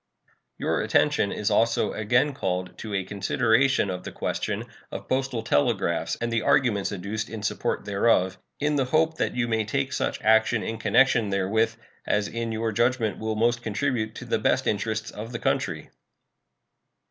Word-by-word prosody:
Your -, -, 0 dB
attention 150 Hz, -9 st, +2 dB
is 105 Hz, -, -1 dB
also 115 Hz, 0 st, +2 dB
again 120 Hz, +7 st, +2 dB
called 90 Hz, -7 st, -3 dB
to 110 Hz, -, -6 dB
a 95 Hz, -, 0 dB
consideration 115 Hz, +4 st, +2 dB
of 90 Hz, 0 st, -5 dB
the -, -, -6 dB
question -, -, -3 dB, 0.3 s
of -, -, -7 dB
postal 130 Hz, -3 st, -1 dB
telegraphs 95 Hz, -, +1 dB
and 120 Hz, 0 st, -2 dB
the 115 Hz, -, +1 dB
arguments 110 Hz, -7 st, +2 dB
adduced 100 Hz, +3 st, -4 dB
in 110 Hz, -2 st, -7 dB
support 105 Hz, -, -2 dB
thereof, 100 Hz, -2 st, +2 dB, 0.2 s
in 150 Hz, 0 st, +1 dB
the 135 Hz, -, +2 dB
hope 160 Hz, +4 st, +1 dB
that -, -, 0 dB
you 125 Hz, -1 st, 0 dB
may 110 Hz, -1 st, +1 dB
take 105 Hz, -, -2 dB
such -, -, -1 dB
action 110 Hz, +1 st, +3 dB
in 110 Hz, 0 st, -4 dB
connection 115 Hz, -2 st, +3 dB
therewith 110 Hz, +4 st, +1 dB, 0.3 s
as 105 Hz, 0 st, +1 dB
in 115 Hz, -1 st, -3 dB
your 110 Hz, 0 st, -1 dB
judgment 120 Hz, 0 st, +1 dB
will 110 Hz, 0 st, -2 dB
most 120 Hz, +2 st, +1 dB
contribute 115 Hz, -1 st, -2 dB
to -, -, -8 dB
the -, -, 0 dB
best -, -, +1 dB
interests 110 Hz, +1 st, -1 dB
of 110 Hz, +3 st, -7 dB
the -, -, -2 dB
country. -, -, -2 dB
110 Hz, 170 wpm, -25 LUFS, 105-120 Hz, 0.3 s, action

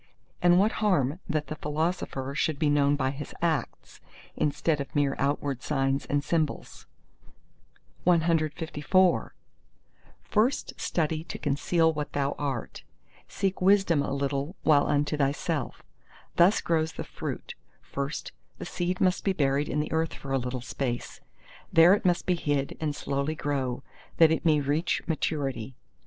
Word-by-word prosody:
And 175 Hz, 0 st, +5 dB
what 205 Hz, +4 st, +4 dB
harm 175 Hz, -7 st, +2 dB
that 155 Hz, -2 st, 0 dB
the 155 Hz, -, -5 dB
philosopher 150 Hz, -3 st, -2 dB
should 155 Hz, +1 st, 0 dB
be 145 Hz, 0 st, +2 dB
known 145 Hz, 0 st, +3 dB
by 130 Hz, -2 st, 0 dB
his 140 Hz, +1 st, -8 dB
acts, 165 Hz, -4 st, -2 dB, 0.3 s
instead 150 Hz, 0 st, 0 dB
of 140 Hz, -, -8 dB
mere 140 Hz, -2 st, +2 dB
outward 140 Hz, -2 st, -1 dB
signs 135 Hz, -1 st, 0 dB
and 145 Hz, 0 st, 0 dB
symbols?" 155 Hz, 0 st, -2 dB, 1.2 s
CLV 165 Hz, +1 st, +2 dB, 0.9 s
First 230 Hz, +6 st, +1 dB
study 160 Hz, -1 st, -1 dB
to -, -, -6 dB
conceal 160 Hz, +3 st, +1 dB
what 150 Hz, -1 st, -4 dB
thou 140 Hz, -1 st, 0 dB
art; 135 Hz, -5 st, -4 dB, 0.5 s
seek 195 Hz, -2 st, -2 dB
wisdom 190 Hz, -5 st, +4 dB
a 140 Hz, -, -2 dB
little 140 Hz, +4 st, -2 dB
while 145 Hz, -2 st, +4 dB
unto 145 Hz, +1 st, +1 dB
thyself. 140 Hz, 0 st, -1 dB, 0.5 s
Thus 180 Hz, +5 st, +5 dB
grows 160 Hz, -1 st, 0 dB
the -, -, -5 dB
fruit; -, -, -6 dB, 0.3 s
first, 140 Hz, +1 st, -4 dB, 0.3 s
the -, -, -7 dB
seed 180 Hz, +1 st, -2 dB
must 185 Hz, -1 st, +2 dB
be 195 Hz, -, +1 dB
buried 140 Hz, -2 st, +1 dB
in 150 Hz, -, -1 dB
the 150 Hz, -, -5 dB
earth 160 Hz, 0 st, 0 dB
for 135 Hz, -, -8 dB
a 135 Hz, -, +2 dB
little 125 Hz, 0 st, -4 dB
space; 120 Hz, -1 st, -4 dB, 0.5 s
there 165 Hz, +3 st, +7 dB
it 205 Hz, -, 0 dB
must 175 Hz, -1 st, +2 dB
be 180 Hz, -, +2 dB
hid 145 Hz, -5 st, -1 dB
and 150 Hz, -2 st, -1 dB
slowly 140 Hz, +2 st, -2 dB
grow, 135 Hz, -4 st, -2 dB, 0.3 s
that 165 Hz, -1 st, +6 dB
it 160 Hz, -, 0 dB
may 155 Hz, -2 st, +4 dB
reach 150 Hz, +5 st, 0 dB
maturity. 135 Hz, -7 st, -2 dB
150 Hz, 145 wpm, -27 LUFS, 140-165 Hz, 1.2 s, there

